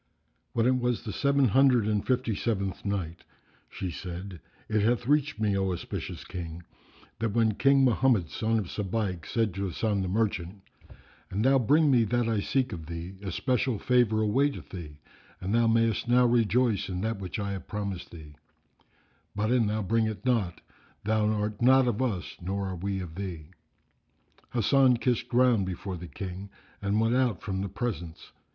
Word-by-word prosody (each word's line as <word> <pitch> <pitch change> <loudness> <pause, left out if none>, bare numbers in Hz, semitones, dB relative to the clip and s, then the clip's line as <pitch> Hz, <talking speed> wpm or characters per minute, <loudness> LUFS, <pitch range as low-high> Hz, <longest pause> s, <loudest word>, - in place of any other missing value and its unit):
When 115 -1 +2
it 130 +1 +3
was 120 -1 -1
the 110 -3 -5
Seven 140 -2 +2
Hundred 125 -1 +4
and 105 -2 +1
Fifty 125 -3 0
seventh 100 -5 -2
Night, 90 -5 -3 0.5
She 90 - -5
said, 90 +3 -7 0.3
It 110 -1 +1
hath 120 +3 +1
reached 145 -2 +1
me, 105 -2 +1
O 95 -1 0
auspicious 90 - -5
King, 85 -2 -7 0.6
that 115 -3 -1
when 110 -1 +3
King 135 +5 +4
Mohammed 120 -8 +3
son 115 0 0
of 105 - -1
Sabaik 95 -4 -2
said 115 -5 0
to 100 +1 -2
Hasan 100 +2 -1
the 95 - -2
Merchant, 100 -2 -1 0.7
"An 100 +3 -1
thou 135 +1 +5
bring 145 +5 +4
me 120 -3 +5
that 120 +2 0
I 110 -2 +1
seek 125 +3 0
of 80 -3 -7
thee, 85 +2 -6
especial 120 +5 0
favour 120 -2 +2
awaiteth 135 +7 0
thee 80 -5 -8 0.4
and 95 +3 -3
thou 115 0 +4
mayest 115 0 +2
now 125 +1 +5
rejoice 115 -3 +2
in 90 -1 -3
that 110 -1 -2
which 95 -3 -5
I 100 -1 -2
have 95 -2 -6
promised 100 -3 -4
thee; 80 -3 -12 1.0
but, 105 +2 0
an 120 -4 +3
thou 105 +1 -1
bring 110 +3 +1
it 110 +3 -6
not, 110 -9 0 0.4
thou 110 0 +1
art 105 0 -1
not 130 +1 +5
of 120 0 0
us 105 -9 -2
nor 95 +2 -2
are 95 - -4
we 95 +2 -3
of 85 -3 -7
thee." 85 -4 -6 1.0
Hasan 125 +2 +4
kissed 120 +1 0
ground 120 -5 +3
before 95 +1 -4
the 90 +1 -8
King 95 +5 -7 0.3
and 100 +1 +1
went 115 +2 +2
out 125 -9 +1
from 95 -1 -2
the 100 - -3
presence. 95 -6 -5
105 Hz, 175 wpm, -28 LUFS, 95-120 Hz, 1.0 s, thou